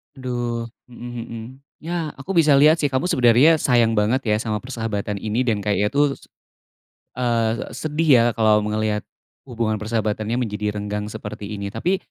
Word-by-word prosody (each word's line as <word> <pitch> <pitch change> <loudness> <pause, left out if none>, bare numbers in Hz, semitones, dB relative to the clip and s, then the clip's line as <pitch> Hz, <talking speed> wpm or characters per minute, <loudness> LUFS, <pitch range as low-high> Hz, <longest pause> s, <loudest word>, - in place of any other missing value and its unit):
Aduh, 120 -2 -3 0.2
mhm 120 -1 -7
mhm, 115 -2 -7 0.4
ya 165 -2 -3
aku 140 +8 -5
bisa 155 -3 +5
lihat 155 +4 +5
sih 145 - +2
kamu 130 +5 0
sebenernya 125 +5 +5
sayang 120 -3 +3
banget 110 +6 +2
ya, 105 - +3
sama 110 -2 -2
persahabatan 110 -5 -3
ini 110 +5 -1
dan 110 -4 0
kayaknya 105 0 0
tuh 145 +1 +3
s - - -21 0.9
eee, 115 -2 0
sedih 155 +4 -2
ya - - +3
kalau 110 -1 +4
melihat 105 0 -1 0.5
hubungan 115 -2 -1
persahabatannya 110 +1 -1
menjadi 105 -3 -2
renggang 105 0 -3
seperti 105 -1 -7
ini, 100 0 -4
tapi 190 +2 0
115 Hz, 160 wpm, -22 LUFS, 105-130 Hz, 0.9 s, bisa